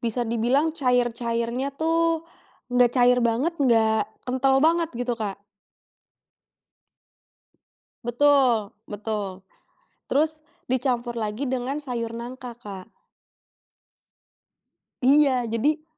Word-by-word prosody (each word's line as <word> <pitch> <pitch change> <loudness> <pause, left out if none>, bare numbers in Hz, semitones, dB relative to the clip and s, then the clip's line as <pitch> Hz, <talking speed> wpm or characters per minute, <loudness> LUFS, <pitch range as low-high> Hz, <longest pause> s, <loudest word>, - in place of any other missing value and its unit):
bisa 235 +1 -1
dibilang 245 +7 +1
cair-cairnya 240 -2 0
tuh 330 +1 +1 0.5
nggak 245 -1 +5
cair 250 0 +5
banget, 240 +9 +1
nggak 225 -4 +3 0.2
kental 260 +1 +2
banget 330 0 +3
gitu 245 0 -1
Kak. 205 -3 -5 2.6
Betul, 240 -3 +3
betul. 205 -3 -5 0.7
Terus 310 +2 0 0.2
dicampur 245 -2 -1
lagi 220 +4 -3
dengan 260 +3 -2
sayur 240 -5 -4
nangka 245 +1 -7
Kak. 195 -5 -9 2.2
Iya 270 -2 +4
jadi 295 +7 0
245 Hz, 85 wpm, -24 LUFS, 230-275 Hz, 2.6 s, nggak